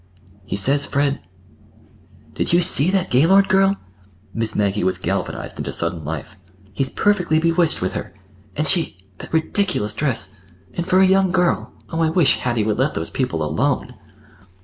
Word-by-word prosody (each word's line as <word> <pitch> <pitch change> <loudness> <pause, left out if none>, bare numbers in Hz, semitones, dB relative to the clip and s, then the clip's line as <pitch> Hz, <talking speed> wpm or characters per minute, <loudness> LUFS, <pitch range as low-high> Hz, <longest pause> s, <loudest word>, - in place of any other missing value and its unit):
"He - - -3
says 140 +8 +1
Fred—" 140 0 0 1.1
"Did - - -1
you 175 - +5
see 170 -2 +4
that 190 -1 0
Gaylord 190 +10 +5
girl?" 195 +1 +3 0.6
Miss 115 -1 -1
Maggie 100 -1 0
was 95 0 0
galvanized - - -4
into - - -3
sudden 85 -1 -2
life. 80 +5 -6 0.4
"He's 135 +5 -1
perfectly 180 -6 +1
bewitched 165 - +1
with 90 - -1
her. - - -5 0.4
And 155 - -1
she—that 95 - -1
ridiculous 160 - 0
dress—and 105 - -4
for 185 0 +4
a - - +6
young 190 0 +3
girl! 180 -2 0 0.2
Oh, 165 - -3
I 165 -1 +2
wish 160 -4 +3
Hattie 120 -3 0
would 105 +2 -1
let 135 +3 +1
those 80 - -3
people 85 - -2
alone!" 75 - -1
140 Hz, 155 wpm, -20 LUFS, -, 1.1 s, a